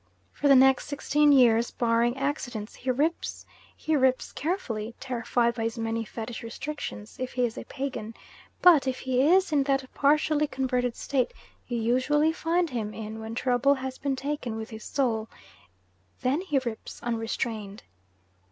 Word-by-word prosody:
For 290 - 0
the 275 - +8
next 265 0 +5
sixteen 295 +1 +2
years, 235 -4 +5
barring 235 +1 +1
accidents, 255 -6 -3
he 260 - -6
"rips"; 295 +7 -1 0.3
he 315 - 0
rips 260 -2 +2
carefully, 240 - -3
terrified 235 -1 0
by 235 - -5
his 225 +1 -2
many 225 0 -1
fetish 225 +2 -6
restrictions, 230 -2 -6
if 255 0 -4
he 250 -1 +2
is 225 - -4
a - - -7
pagan; 250 -5 -5 0.5
but 325 -7 +7
if 260 -1 -2
he 255 -1 +1
is 365 +5 +4
in 295 -2 +3
that 270 -1 +1
partially 300 +1 +3
converted 250 -3 -1
state 260 -3 -1 0.3
you 240 - -2
usually 260 +7 +2
find 335 0 0
him 215 -4 -3
in 220 0 -6
when 220 +1 -6
trouble 255 +3 +3
has 260 -1 -6
been 275 -1 -1
taken 265 -4 -3
with 220 +1 -6
his 220 0 -8
soul 225 -6 -1 0.9
then 270 +6 +1
he 310 -7 -1
rips 225 -2 -6
unrestrained. 225 -3 -3
255 Hz, 160 wpm, -27 LUFS, 230-285 Hz, 0.9 s, the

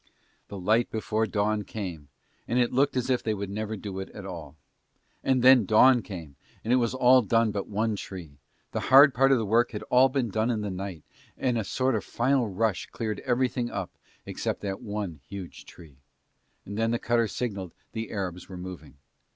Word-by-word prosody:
The 100 - -8
light 110 +6 +2
before 110 0 -1
dawn 105 +1 0
came 90 -8 -6 0.4
and 120 - 0
it 120 -1 +2
looked 135 +1 +2
as 125 - 0
if 125 - +2
they 110 -1 -1
would 100 -1 -5
never 110 +1 -3
do 95 -1 -6
it 95 - -6
at 100 - -8
all. 85 -5 -8 0.7
And 130 -2 +2
then 130 -2 +8
dawn 120 +5 +5
came 80 -10 -9 0.3
and 115 - +1
it - - +5
was 120 0 0
all 130 0 +6
done 115 0 +2
but 100 -1 -4
one 110 +1 -1
tree, 85 -8 -9 0.3
the - - -2
hard 135 +1 +8
part 135 +3 +4
of 135 - +5
the 110 - -1
work 115 +4 +2
had 105 - -5
all 130 +2 +6
been 130 -3 -1
done 110 +3 0
in 110 -3 0
the 105 -1 -3
night 95 -4 -6 0.3
and 125 -2 0
a 115 - 0
sort 130 +6 0
of - - -1
final 130 -3 +1
rush 100 +1 -1
cleared 110 -3 -4
everything 125 -1 0
up - - -4 0.3
except - - -3
that 100 +1 -4
one 100 - -4
huge 95 -3 -8
tree. 75 -6 -15 0.7
And 100 +2 -5
then 115 0 +2
the 120 - +1
cutter 115 -1 +1
signalled 100 -6 -4 0.2
the 110 -1 -5
Arabs 90 -4 -4
were 95 - -8
moving. 90 -5 -9
110 Hz, 200 wpm, -27 LUFS, 95-120 Hz, 0.7 s, then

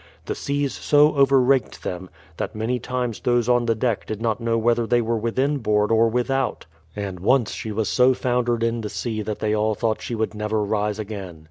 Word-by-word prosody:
The - - -2
seas 140 -1 -2
so 150 +1 +3
over 135 -1 +5
raked 130 -1 +1
them, 90 0 -5 0.3
that - - -4
many 115 +3 -1
times 125 -2 -3
those 120 -1 +1
on 120 -1 +2
the 115 - +2
deck 115 -1 -1
did 110 - -4
not 115 0 -1
know 115 0 +1
whether 115 0 +1
they 120 0 +3
were 115 0 0
within 130 +6 0
board 105 -2 +1
or 115 0 +4
without; 130 +3 -1 0.3
and 100 -3 -5
once 120 +4 +2
she 110 - -5
was 110 0 -1
so 130 +1 +4
foundered 120 -2 0
in 115 0 0
the 105 - -4
sea 110 -1 -3
that 105 0 -4
they 110 0 -1
all 110 0 +1
thought 110 0 -1
she 120 - -4
would 110 -1 -2
never 105 0 -1
rise 105 0 -1
again. 100 -6 -7
115 Hz, 215 wpm, -23 LUFS, 110-125 Hz, 0.3 s, over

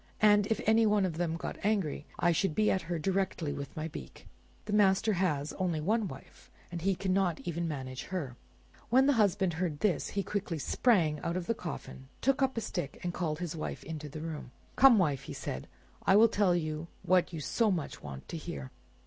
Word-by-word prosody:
And 205 -1 +6
if 225 - 0
any 220 +1 +5
one 210 -2 +3
of 165 -4 -3
them 165 -1 -1
got - - -5
angry, 195 -9 0
I 175 - +3
should 170 -1 +1
be 215 - +3
at 190 - +1
her 175 - 0
directly 180 -3 -1
with 140 +2 -7
my 155 +1 -2
beak. 165 - -10 0.4
The 210 - -3
master 205 +1 +4
has 155 -6 0
only 175 -4 0
one 210 +7 +1
wife, - - -12 0.2
and 170 -1 -4
he 195 +2 +2
cannot 185 -3 +1
even 170 0 -2
manage 130 -4 -5
her." 155 -10 -4 0.5
When 260 +3 +5
the 285 - +5
husband 200 -5 +2
heard 160 -3 -2
this 210 -5 +1
he 200 - +2
quickly 195 -5 -3
sprang 160 - +2
out 170 +4 -2
of 180 - -3
the 230 - +1
coffin, 160 - -7
took 275 +2 +2
up 265 -2 +1
a - - +1
stick, 140 -9 -4
and 175 -1 -2
called 160 -4 -2
his 170 -1 -4
wife 155 - -5
into 155 -2 -6
the 155 +2 -7
room. 155 -5 -5 0.3
"Come, 265 -4 +8
wife," 150 -8 +2
he - - -4
said, 65 - -5 0.3
"I 190 - +4
will 225 +2 +7
tell 200 -4 +3
you 155 -1 -2 0.2
what 185 0 +3
you 165 - -5
so 215 - +1
much 170 -7 -2
want 70 -2 -8
to 170 - -4
hear." 70 - -6
175 Hz, 210 wpm, -31 LUFS, 155-205 Hz, 0.5 s, Come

